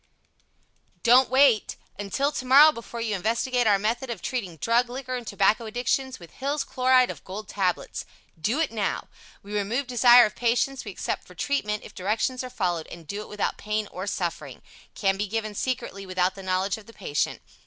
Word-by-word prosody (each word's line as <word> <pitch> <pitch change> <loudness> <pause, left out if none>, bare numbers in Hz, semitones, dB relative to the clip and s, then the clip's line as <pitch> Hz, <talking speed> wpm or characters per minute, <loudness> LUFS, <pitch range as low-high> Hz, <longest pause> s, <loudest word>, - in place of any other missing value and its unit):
Don't 250 +2 +6
Wait 260 -4 +4 0.2
Until 270 +9 0
tomorrow 280 +3 +6
before 235 -3 -7
you 225 -2 -1
investigate 235 +5 0
our 205 -2 +5
method 230 +6 -2
of 230 -5 -4
treating 190 -7 -4
Drug, 235 - +2
Liquor 255 0 -5
and 245 -3 -6
Tobacco 215 +3 +2
addictions 250 +3 -1
with 170 -2 -13
Hill's 280 +2 -2
Chloride 255 -1 +3
of - - -11
Gold 200 +2 -7
Tablets. 185 -3 -2 0.5
Do 260 +7 0
it 320 - +1
Now 210 -4 -2 0.3
We 205 +1 -9
remove 220 +7 -1
desire 245 -1 +7
of 210 - -4
patients 245 +3 0
we - - -5
accept - - -4
for - - -15
treatment, 210 -7 -1
if - - -12
directions 220 +7 -1
are 255 - -6
followed, 175 -8 -2
and 170 -1 -11
do 200 +7 -5
it - - -10
without 210 - -2
pain 210 0 -2
or 185 +2 -6
suffering. 175 -3 -4 0.3
Can 195 -1 +1
be 205 +1 -2
given 215 +1 -3
Secretly 230 -4 -3
without 185 0 +1
the 195 - -10
knowledge 185 +1 0
of 210 - -17
the 230 - -13
patient. 150 -9 -2
225 Hz, 185 wpm, -26 LUFS, 195-255 Hz, 0.5 s, desire